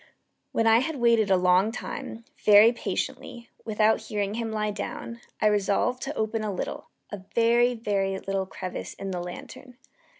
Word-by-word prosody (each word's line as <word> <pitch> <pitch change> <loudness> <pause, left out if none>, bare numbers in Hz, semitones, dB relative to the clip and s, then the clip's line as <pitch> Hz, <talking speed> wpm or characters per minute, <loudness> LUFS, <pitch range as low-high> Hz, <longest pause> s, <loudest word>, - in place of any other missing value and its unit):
When 225 - +1
I 225 0 +6
had 315 +5 -2
waited 235 -4 +3
a 190 - +5
long 180 +3 +3
time, 230 -1 -7 0.2
very 210 +2 +8
patiently, 235 0 -5 0.2
without 220 0 +2
hearing 205 -1 -3
him 225 0 -3
lie 215 -1 -1
down, 235 +3 -6 0.2
I - - 0
resolved 210 +4 +1
to 290 +2 -4
open 220 0 -1
a 210 - -2
little 185 - -5 0.2
a 205 - -6
very, 235 +1 +4
very 195 -4 -1
little 195 0 -3
crevice 185 -1 -6
in 195 -1 -5
the 180 -1 -3
lantern. 240 +8 -9
215 Hz, 165 wpm, -26 LUFS, 195-235 Hz, 0.2 s, very